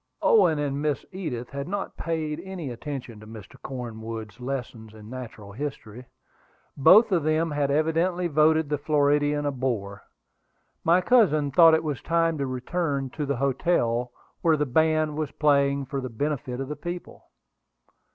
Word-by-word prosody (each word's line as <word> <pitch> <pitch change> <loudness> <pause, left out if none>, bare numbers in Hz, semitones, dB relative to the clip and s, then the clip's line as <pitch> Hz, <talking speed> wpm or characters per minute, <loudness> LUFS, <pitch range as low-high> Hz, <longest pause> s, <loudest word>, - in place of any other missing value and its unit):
Owen 435 - +5
and 145 -1 -2
Miss 150 -2 -1
Edith 150 -11 -5
had 140 +1 -5
not 200 +2 -4
paid 160 -2 -3
any 185 -8 -6
attention 125 -3 -7
to 110 - -13
Mr. 110 -3 -12
Cornwood's 115 -3 -7
lessons 125 -4 -6
in 110 +1 -12
natural 115 -5 -8
history. 125 -1 -7 0.7
Both 200 - +6
of 175 -3 +3
them 155 +2 +1
had 145 -1 0
evidently 165 +5 +1
voted 155 0 +3
the 150 -1 -2
Floridian 145 0 +2
a 145 - +1
bore. 115 -7 -3 0.8
My 170 +3 +4
cousin 170 - +3
thought 165 +2 +7
it 160 - -1
was 150 -4 -3
time 165 -1 +1
to 140 - -1
return 135 +1 -2
to 150 +1 -4
the 140 - 0
hotel, 125 -3 0 0.3
where 165 -2 +3
the 150 - +1
band 155 +2 +1
was 155 -2 -2
playing 140 -2 +2
for 135 +1 -4
the 130 - -5
benefit 130 0 -3
of 135 - -3
the 150 - -4
people. 175 +2 -7
145 Hz, 160 wpm, -25 LUFS, 125-160 Hz, 0.8 s, thought